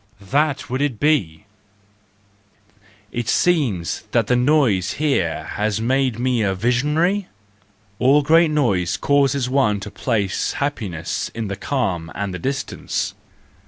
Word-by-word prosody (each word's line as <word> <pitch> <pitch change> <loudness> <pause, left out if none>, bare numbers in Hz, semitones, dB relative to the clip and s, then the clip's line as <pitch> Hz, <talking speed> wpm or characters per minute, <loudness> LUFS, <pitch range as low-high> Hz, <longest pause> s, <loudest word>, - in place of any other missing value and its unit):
That 145 0 +1
would 130 -2 -1
be 105 - +1 1.7
it! - - -3
It 120 - -3
seems 130 - +1
that - - +3
the 125 - +2
noise 125 - +2
here 135 - 0
has 105 0 -1
made 130 0 +1
me 125 -1 0
a 95 -2 +1
visionary? 150 - +1 0.7
All 140 +4 +4
great 165 +2 +5
noise 100 - +1
causes 140 -2 +2
one 130 -6 +2
to 105 - -7
place 105 -7 -1
happiness 100 - -3
in 115 -3 -3
the 100 - -3
calm 95 - -2
and 100 -1 -3
the 90 - -5
distance. 135 +6 -3
125 Hz, 125 wpm, -21 LUFS, 100-145 Hz, 1.7 s, great